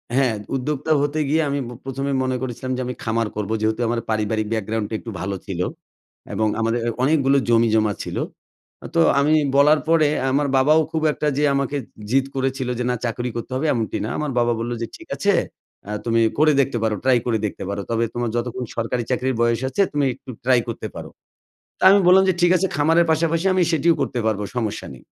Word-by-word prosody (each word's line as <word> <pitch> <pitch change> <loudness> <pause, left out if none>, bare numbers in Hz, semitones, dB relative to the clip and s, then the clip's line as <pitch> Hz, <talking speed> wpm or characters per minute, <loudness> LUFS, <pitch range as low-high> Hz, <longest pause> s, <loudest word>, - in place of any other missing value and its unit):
হ্যাঁ, 130 -4 +2 0.2
উদ্যোক্তা 145 +3 -2
হতে 145 +2 -1
গিয়ে 160 +2 +3
আমি 140 - -1
ব - - -8 0.2
প্রথমে 135 +1 -3
মনে 130 0 -1
করেছিলাম 130 0 -4
যে 130 - -2
আমি 125 0 -4
খামার 115 0 0
করবো, 105 0 -2
যেহেতু 110 +2 0
আমার 120 0 0
পারিবারিক 110 0 0
background 110 0 -2
টা - - -7
একটু 115 - -8
ভালো 100 +2 -2
ছিল। 95 -4 -5 0.7
এবং 110 - +1
আমাদের 115 +1 0 0.2
অনেকগুলো 140 -1 +3
জমিজমা 110 -2 +3
ছিল। - - -5 0.8
তো 165 - +5 0.2
আমি 145 +2 +3 0.2
বলার 150 +2 +5
পরে 165 -2 +4 0.2
আমার 145 +1 +1
বাবাও 150 +4 +5
খুব 160 - -1
একটা 150 - -2
যে 150 - +1
আমাকে 140 +1 -1 0.3
জিদ 135 +2 +3
করেছিল 130 -1 -1
যে - - 0
না 125 - +1
চাকুরি 120 +1 -2
করতে 120 +2 -5
হবে 155 +4 0
এমনটি 115 -3 -2
না। - - -3
আমার 150 -2 -2
বাবা 120 0 +2
বললো 120 +1 -2
যে, 115 - -2
"ঠিক 330 - -14
আছে। 200 0 +2 0.5
অ্যা 105 - -5
তুমি 115 0 +2 0.2
করে 155 0 +5
দেখতে 135 -2 -1
পারো। 110 -1 +1
Try 130 -2 +4
করে 115 -2 +1
দেখতে 100 - -5
পারো। 100 0 -3
তবে 115 0 +1
তোমার 120 -1 -2
যতক্ষণ 125 +1 -3
সরকারি 120 +1 -1
চাকরির 130 +1 0
বয়স 120 +1 +2
আছে 200 - 0
তুমি 145 -1 +1
একটু 130 - -16 0.2
try 125 -1 +5
করতে 115 - -4
পারো"। - - -7 0.7
তা - - +1
আমি 200 +1 +6
বললাম 190 +1 +7
যে, 190 - +3
"ঠিক 175 0 +4
আছে 190 - +1
খামারের 165 +3 +3
পাশাপাশি 165 +3 0
আমি 185 - +3
সেটিও 165 +2 +3
করতে 120 - -1
পারব, 110 -2 0 0.2
সমস্যা 110 -4 -2
নেই"। 65 - -15
130 Hz, 205 wpm, -22 LUFS, 115-150 Hz, 0.8 s, বললাম